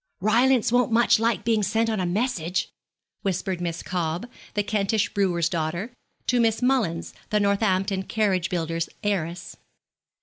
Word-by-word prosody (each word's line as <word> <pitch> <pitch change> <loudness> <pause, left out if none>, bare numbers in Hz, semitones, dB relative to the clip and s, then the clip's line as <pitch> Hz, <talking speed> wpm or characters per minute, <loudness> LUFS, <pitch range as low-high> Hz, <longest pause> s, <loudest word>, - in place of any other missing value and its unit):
'Rylance 235 +3 +3
won't 245 -1 +3
much 230 -1 +4
like 230 +1 +1
being 225 -2 +2
sent 225 +3 +1
on 220 -2 -1
a 180 - 0
message,' 185 -3 -1 0.5
whispered 190 -1 -2
Miss 170 -1 -3
Cobb, 175 +2 -2 0.3
the 205 - +1
Kentish 205 +1 0
brewer's 175 -5 +1
daughter, 170 +7 -3 0.3
to 250 - +2
Miss 225 -1 +2
Mullins, 230 -11 +1 0.2
the 210 - +2
Northampton 195 -1 +1
carriage 190 -3 0
builder's 165 -1 -2
heiress. 180 -3 -2
200 Hz, 140 wpm, -25 LUFS, 175-225 Hz, 0.5 s, much